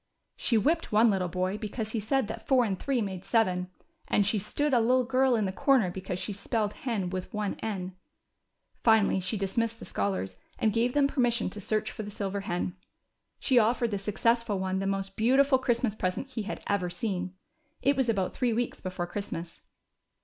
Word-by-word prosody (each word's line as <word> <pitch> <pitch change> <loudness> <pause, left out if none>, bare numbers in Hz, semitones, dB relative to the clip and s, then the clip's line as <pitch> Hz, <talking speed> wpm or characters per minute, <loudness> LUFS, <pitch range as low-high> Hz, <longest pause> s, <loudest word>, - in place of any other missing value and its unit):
She 235 - +1
whipped 320 +9 +1
one 220 +1 +5
little 190 -2 0
boy 185 +3 -2
because 220 0 -4
he 225 - -1
said 265 +5 +1
that 220 +1 -7
four 255 -3 +4
and 195 -4 -2
three 265 -5 0
made 190 -2 -5
seven, 185 -6 +1 0.4
and 205 - +3
she 210 +1 +2
stood 285 +8 0
a 245 - +6
little 250 +3 +3
girl 260 0 +3
in 215 -3 +1
the 190 - -1
corner 225 -2 +3
because 185 0 -4
she 205 - -4
spelled 210 +1 -1
hen 210 -8 -2
with 185 -1 -4
one 210 -2 -2
n. 190 -4 -4 0.9
Finally 220 -4 +4
she 185 +4 -2
dismissed 225 +4 -1
the - - -10
scholars, 95 - -2 0.2
and 215 -2 +1
gave 235 +2 +1
them 290 -1 +4
permission 245 -7 +1
to 205 - -7
search 215 +2 -1
for - - -6
the 205 - -6
silver 200 -1 -3
hen. 180 -1 -2 0.6
She 255 -3 +4
offered 235 +1 +2
the 200 - -1
successful 230 +2 +1
one 190 0 -1
the 195 - -1
most 195 0 -2
beautiful 265 +4 +4
Christmas 240 -3 +1
present 195 +6 -2
he 245 -4 -4
had 210 +2 -5
ever 195 -3 0
seen. 185 0 -3 0.5
It 280 +1 +4
was 260 -3 +1
about 195 -5 0
three 245 -3 +1
weeks 240 +2 -2
before 185 -1 -3
Christmas. 175 -3 -6
215 Hz, 195 wpm, -29 LUFS, 190-240 Hz, 0.9 s, a